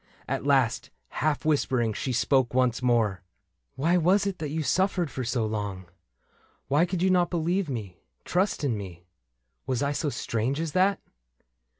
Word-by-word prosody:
At - - -2
last, 135 -5 +2 0.2
half 155 0 -1
whispering, 130 -7 +1
she 130 - -3
spoke 125 +1 +2
once 125 -1 +2
more: 115 -7 +1 0.3
'' - - -50
Why 165 +6 +2
was 185 +4 +3
it 195 -2 -3
that 150 - -3
you 155 +2 -2
suffered 180 +2 +1
for 130 - -4
so 120 -1 0
long? 100 -3 -4 0.8
Why 150 +6 +3
could 180 0 -2
you 190 - +3
not 180 -2 +3
believe 175 +1 0
me 105 - -5
— 60 - -48
trust 185 -2 +1
in 130 -5 +1
me? 90 -4 -8 0.6
Was 130 0 0
I 140 - +1
so 145 +1 -1
strange 125 +2 -2
as 165 -1 -2
that 190 +3 +2
140 Hz, 175 wpm, -27 LUFS, 115-170 Hz, 0.8 s, was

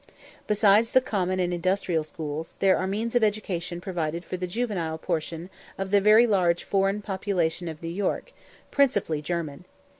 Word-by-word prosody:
Besides 210 +1 +4
the 260 - +5
common 185 -7 -1
and 180 -1 0
industrial 175 -2 0
schools, 155 0 -6
there 195 -1 +4
are 185 - -1
means 220 +4 -2
of 245 -2 +3
education 180 -5 -1
provided 170 -2 -3
for - - -4
the 180 0 -3
juvenile 180 -6 -2
portion 165 +1 -3 0.3
of 195 0 -4
the 205 -1 +5
very 215 +4 +7
large 180 -6 +2
foreign 195 +1 0
population 185 -4 -1
of 160 0 -7
New 165 - -3
York, 205 - -2 0.4
principally 205 - +2
German. 160 0 -4
185 Hz, 160 wpm, -26 LUFS, 170-205 Hz, 0.4 s, very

